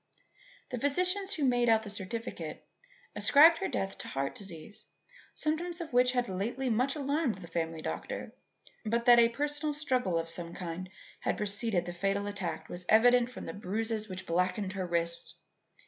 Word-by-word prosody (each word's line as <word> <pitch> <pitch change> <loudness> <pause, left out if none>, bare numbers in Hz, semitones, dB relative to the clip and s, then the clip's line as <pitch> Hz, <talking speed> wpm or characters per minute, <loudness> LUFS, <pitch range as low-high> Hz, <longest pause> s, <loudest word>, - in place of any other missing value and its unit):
The 250 - -3
physicians 365 - +2
who 305 - -2
made 245 -2 +3
out 220 -1 +4
the 210 - -7
certificate 210 +4 -5 0.5
ascribed 325 +3 +6
her 390 - -1
death 195 0 -3
to - - -6
heart 135 +1 -2
disease, 190 +1 -9 0.5
symptoms 335 +3 -2
of 330 -6 -6
which 250 +1 +4
had 245 -1 +1
lately 235 +7 -2
much 255 +6 +1
alarmed 285 - 0
the 180 -3 -10
family 165 -1 -3
doctor; - - -5 0.5
but 235 +1 0
that 240 -1 +8
a 230 0 +6
personal 295 +4 -1
struggle 255 - +1
of 165 0 -2
some 170 0 -3
kind 180 +1 -5 0.3
had - - -1
preceded 205 -2 0
the 175 - -5
fatal 195 +3 -1
attack 200 -4 -4
was 175 0 -7
evident 245 +2 +5
from 250 - -8
the - - -5
bruises 215 +2 -3
which 185 0 -4
blackened 185 +3 0
her 190 -2 -3
wrists. 170 -1 -2
220 Hz, 170 wpm, -31 LUFS, 185-260 Hz, 0.5 s, that